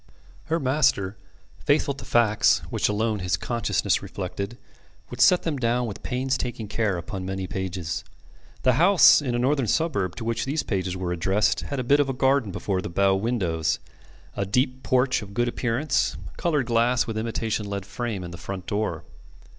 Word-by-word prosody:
Her 165 +1 0
master, 130 - +1 0.5
faithful 145 -1 +2
to 140 - -10
facts, 110 -3 +3
which - - +1
alone 105 0 0
his 90 -1 0
consciousness 115 +7 0
reflected, 100 +4 -5 0.5
would - - -4
set 180 - +6
them 160 -4 -1
down 120 0 +1
with 105 -4 -6
painstaking 125 -3 -2
care 105 -2 0
upon 95 +3 -5
many 95 0 -3
pages. 90 -3 -4 0.6
The 130 - +4
house 185 -3 +7
in 125 -4 -2
a - - +1
northern 130 0 +1
suburb 105 - 0
to 115 - -6
which 115 0 -1
these 145 +3 -1
pages 95 -2 -2
were 90 -1 -3
addressed 95 +5 +1
had 140 - -4
a - - -1
bit 140 +4 +4
of 135 -3 0
garden 135 -5 +2
before 95 0 -2
the - - -5
bow 95 +2 +3
windows, 95 -7 0 0.6
a - - -1
deep 125 +6 0
porch 130 0 +2
of 100 -1 -10
good 120 +2 +1
appearance, 125 +4 0 0.2
coloured 150 -7 0
glass 120 +1 +2
with 115 - -4
imitation 110 -1 -2
lead 100 -1 -4
frame 110 -3 -4
in 85 - -7
the 85 - -9
front 95 +1 -6
door. 100 -7 -2
115 Hz, 175 wpm, -25 LUFS, 95-130 Hz, 0.6 s, house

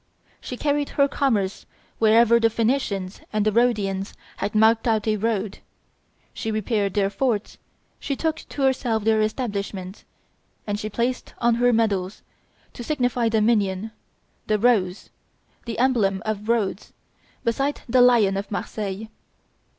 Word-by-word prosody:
She 250 - -7
carried 290 0 0
her 280 -1 +5
commerce 215 -10 -1 0.3
wherever 230 +1 +5
the 230 0 +3
Phoenicians 220 -5 -1
and 215 -1 0
the 215 - +3
Rhodians 205 -4 0 0.2
had 205 - -3
marked 220 +2 +4
out 220 -1 +1
a 215 - +2
road; 210 -2 -2 0.7
she 225 - -4
repaired 215 -2 -1
their 200 -1 +1
forts; 220 -2 -1 0.4
she 275 - -3
took 320 +2 -1
to 280 - -6
herself 250 -5 +1
their 220 0 +3
establishments; 205 -4 -3 0.6
and 205 -1 -2
she 215 - -4
placed 240 +4 -2
on 235 0 +2
her 245 +1 +3
medals, 205 -4 0 0.5
to 240 - -8
signify 245 -4 0
dominion, 215 -2 +1 0.6
the 215 - +2
rose, 205 -5 +1 0.5
the 230 -2 -5
emblem 225 -6 +1
of 215 0 -3
Rhodes, 215 -4 -1 0.5
beside 275 +5 -1
the 250 +1 +4
lion 230 -6 +5
of 200 - -4
Marseilles. 205 0 -4
220 Hz, 135 wpm, -23 LUFS, 205-240 Hz, 0.7 s, her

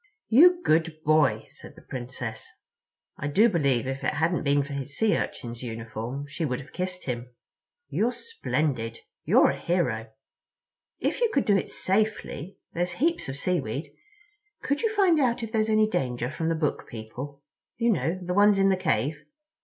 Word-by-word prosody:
"You 350 +9 +7
good 160 0 +2
boy," 155 -3 +3
said - - -12
the - - -15
Princess. 120 -3 -6 0.7
I 145 - -3
do 200 +11 +5
believe 140 - +1
if 135 +1 -4
it - - 0
hadn't 170 +2 +1
been 140 0 +2
for 145 +1 -7
his 140 +1 -4
Sea 220 -1 +3
Urchin's 120 -1 -4
uniform 115 +3 -5
she 155 +3 -4
would 125 -5 -1
have 140 - -12
kissed 180 0 -4
him. 125 -1 -4 0.6
"You're 235 +3 +1
splendid. 150 - -2 0.2
You're - - +5
a - - -6
hero. 125 -11 0 0.9
If - - -1
you 475 - +4
could 275 - +1
do 205 - +4
it 195 - 0
safely—there's 190 -3 -2
heaps 325 - 0
of 135 - -5
seaweed—could 415 - -4
you 450 - +1
find 370 -6 +4
out 240 -3 +1
if 225 - -5
there's 220 -1 +1
any 215 0 +4
danger 125 - -1
from 160 +1 -2
the 165 - +1
Book 155 -2 -1
People? 130 +6 -8 0.3
You 235 0 +3
know—the 180 -1 -1
ones 205 +1 +5
in 195 0 +4
the 190 - +3
cave. 150 -2 0
165 Hz, 165 wpm, -27 LUFS, 135-215 Hz, 0.9 s, You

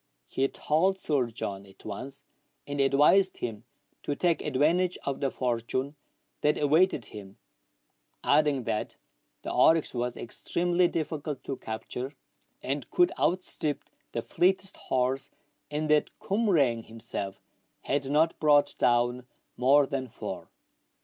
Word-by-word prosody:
He 135 - 0
told 175 +8 +1
Sir 145 -9 0
John 100 -4 -5
at 95 - -17
once, 130 +7 -6 0.4
and 145 0 -2
advised 145 +8 +4
him 115 -1 -5 0.4
to 145 - -2
take 170 +2 +1
advantage 160 +6 +2
of 140 -1 -2
the 135 - +1
fortune 130 +3 -2 0.5
that 150 - +2
awaited 150 - +3
him, 100 -2 -10 0.9
adding 145 -3 +3
that 110 - -2 0.5
the - - -4
oryx 160 -1 +4
was 125 0 -2
extremely 175 +8 +1
difficult 155 -4 -3
to 135 - -3
capture, 125 +4 -5 0.5
and 140 +2 -3
could 355 -1 +3
outstrip 165 -5 -1 0.3
the - - -3
fleetest 190 +2 +1
horse, 130 +1 -1 0.4
and 150 +1 -2
that 150 -1 +4
Cumraing 160 - +1
himself 110 -3 -5 0.4
had 140 -1 -1
not 155 +3 +2
brought 145 -1 +4
down 120 +1 +2 0.3
more 140 +3 +5
than 135 -1 -3
four. 110 - -7
140 Hz, 125 wpm, -28 LUFS, 125-160 Hz, 0.9 s, more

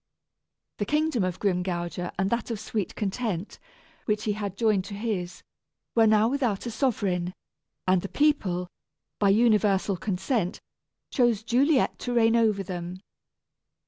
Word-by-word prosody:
The - - 0
kingdom 300 -7 +1
of 185 -1 -2
Grimgouger 180 -2 -1
and 190 +1 0
that 235 +1 -1
of 225 -3 -3
Sweet 215 -2 -3
Content, 205 -2 -3 0.5
which 210 -1 0
he 210 - 0
had 200 -2 -5
joined 215 -5 +2
to 200 - -7
his, 200 -5 -3 0.5
were 225 -1 +5
now 215 0 +5
without 245 -6 0
a 235 - -3
sovereign, 190 -8 0 0.5
and 185 -1 +4
the 195 - -6
people, 200 -13 +1 0.5
by 200 - +4
universal 205 -3 +3
consent, 190 +1 -1 0.5
chose 240 -5 +2
Juliet 260 +4 +2
to 245 -1 -3
reign 225 -1 +4
over 215 -4 +2
them. 180 -1 -5
210 Hz, 140 wpm, -27 LUFS, 185-235 Hz, 0.5 s, were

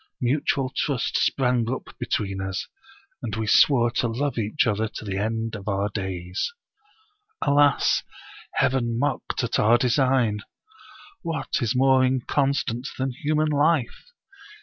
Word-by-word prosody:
Mutual 135 0 0
trust 140 -5 -1
sprang 125 -3 +1
up 130 - -6
between 95 -3 -2
us, 95 0 -3 0.5
and 110 -5 -4
we 110 0 -2
swore 120 +1 +5
to 120 - 0
love 135 +5 -2
each 110 +8 +1
other 110 -1 0
to 110 - -9
the 100 -1 -2
end 115 +1 -2
of 100 -1 -9
our 100 0 0
days. 95 - -3 0.9
"Alas! 145 0 +3 0.5
Heaven 120 -3 +1
mocked 140 0 -1
at 120 - 0
our 115 +3 +5
design! 125 -3 +2 0.8
What 165 -3 -2
is 120 +1 0
more 130 0 +4
inconstant 130 -1 0
than 130 0 -1
human 150 +4 0
life? 150 - +1
125 Hz, 130 wpm, -24 LUFS, 110-135 Hz, 0.9 s, swore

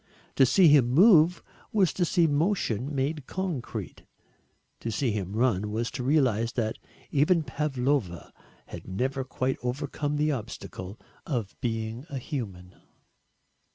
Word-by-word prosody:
To 135 - +5
see 185 +6 +5
him 145 -5 +5
move 175 - +5 0.3
was 195 -6 +2
to 180 - +1
see 170 0 +3
motion 145 - 0
made 140 +1 -2
concrete 180 -10 -4 0.8
to 115 - -4
see 120 +2 0
him 100 -2 -3
run 110 -3 +1
was 115 +2 -2
to - - -5
realise 125 -5 +2
that 110 -2 -2 0.3
even 155 +4 +3
Pavlova 135 - -2 0.3
had - - -10
never 130 +8 -2
quite 130 0 -2
overcome 145 +3 -2
the 150 +1 +2
obstacle 105 -5 -6 0.3
of 120 -9 -3
being 115 +2 -3
a 140 - -4
human. 100 - -6
130 Hz, 130 wpm, -27 LUFS, 115-150 Hz, 0.8 s, To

